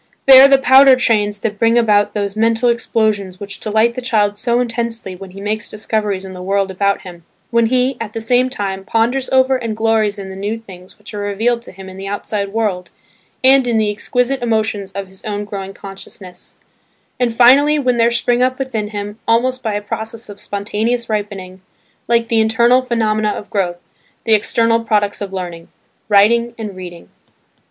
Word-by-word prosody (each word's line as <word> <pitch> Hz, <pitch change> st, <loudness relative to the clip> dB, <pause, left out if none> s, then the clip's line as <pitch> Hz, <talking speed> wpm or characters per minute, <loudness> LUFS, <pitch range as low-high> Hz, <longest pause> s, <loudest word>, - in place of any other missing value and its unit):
They 265 Hz, -1 st, +9 dB
are 275 Hz, -, +9 dB
the 275 Hz, 0 st, +5 dB
powder 265 Hz, 0 st, +6 dB
trains 210 Hz, -5 st, 0 dB
that 210 Hz, -2 st, -3 dB
bring 230 Hz, 0 st, +3 dB
about 210 Hz, -3 st, +2 dB
those 200 Hz, -1 st, -2 dB
mental 230 Hz, +2 st, +2 dB
explosions 215 Hz, -5 st, -1 dB
which 200 Hz, -1 st, -8 dB
delight 220 Hz, +2 st, +1 dB
the 255 Hz, -, -5 dB
child 210 Hz, -5 st, 0 dB
so 240 Hz, 0 st, +1 dB
intensely 230 Hz, -5 st, -3 dB
when 190 Hz, +1 st, -10 dB
he 190 Hz, +2 st, -12 dB
makes 210 Hz, +1 st, -3 dB
discoveries 210 Hz, -2 st, -3 dB
in 190 Hz, -, -9 dB
the 180 Hz, -, -9 dB
world 195 Hz, +1 st, -1 dB
about 200 Hz, +1 st, 0 dB
him, 175 Hz, -3 st, -11 dB, 0.3 s
when 235 Hz, -1 st, +3 dB
he, 255 Hz, +2 st, +1 dB
at 215 Hz, -2 st, -6 dB
the -, -, -4 dB
same 245 Hz, +3 st, +2 dB
time, 195 Hz, -6 st, -4 dB
ponders 235 Hz, +6 st, 0 dB
over 260 Hz, 0 st, +3 dB
and 230 Hz, -3 st, -5 dB
glories 220 Hz, -2 st, +1 dB
in 195 Hz, -1 st, -7 dB
the -, -, -8 dB
new 205 Hz, +3 st, -3 dB
things 185 Hz, -5 st, -14 dB
which 210 Hz, +1 st, -13 dB
are 205 Hz, -, -5 dB
revealed 220 Hz, +4 st, -1 dB
to -, -, -11 dB
him 190 Hz, 0 st, -12 dB
in 190 Hz, 0 st, -10 dB
the 195 Hz, +1 st, -7 dB
outside 200 Hz, 0 st, -3 dB
world, 205 Hz, -5 st, -2 dB, 0.5 s
and 265 Hz, -1 st, +5 dB
in 235 Hz, -2 st, +1 dB
the 215 Hz, -1 st, +1 dB
exquisite 245 Hz, +5 st, -1 dB
emotions 220 Hz, -4 st, -1 dB
of 200 Hz, 0 st, -4 dB
his 190 Hz, 0 st, -15 dB
own 205 Hz, -1 st, -4 dB
growing 195 Hz, -2 st, -6 dB
consciousness; 195 Hz, -2 st, -11 dB, 0.6 s
and 240 Hz, -2 st, 0 dB
finally 275 Hz, +5 st, +5 dB
when 255 Hz, -4 st, 0 dB
there 230 Hz, 0 st, +4 dB
spring 240 Hz, +1 st, 0 dB
up 255 Hz, 0 st, +1 dB
within 240 Hz, -6 st, -3 dB
him, 205 Hz, +1 st, -6 dB
almost 255 Hz, +3 st, +1 dB
by 220 Hz, -4 st, -2 dB
a 205 Hz, -, -3 dB
process 220 Hz, +1 st, -6 dB
of 205 Hz, 0 st, -10 dB
spontaneous 220 Hz, +4 st, -3 dB
ripening, 195 Hz, -3 st, -4 dB, 0.5 s
like 235 Hz, -1 st, +2 dB
the 225 Hz, -2 st, +2 dB
internal 235 Hz, +3 st, +3 dB
phenomena 220 Hz, -4 st, 0 dB
of 210 Hz, -, -6 dB
growth, 180 Hz, -4 st, -1 dB, 0.5 s
the 225 Hz, -, +2 dB
external 230 Hz, +2 st, +2 dB
products 210 Hz, -2 st, 0 dB
of 200 Hz, -1 st, -5 dB
learning–writing 200 Hz, +6 st, -1 dB
and 210 Hz, -4 st, -6 dB
reading. 175 Hz, -2 st, -10 dB
220 Hz, 190 wpm, -17 LUFS, 200-235 Hz, 0.6 s, They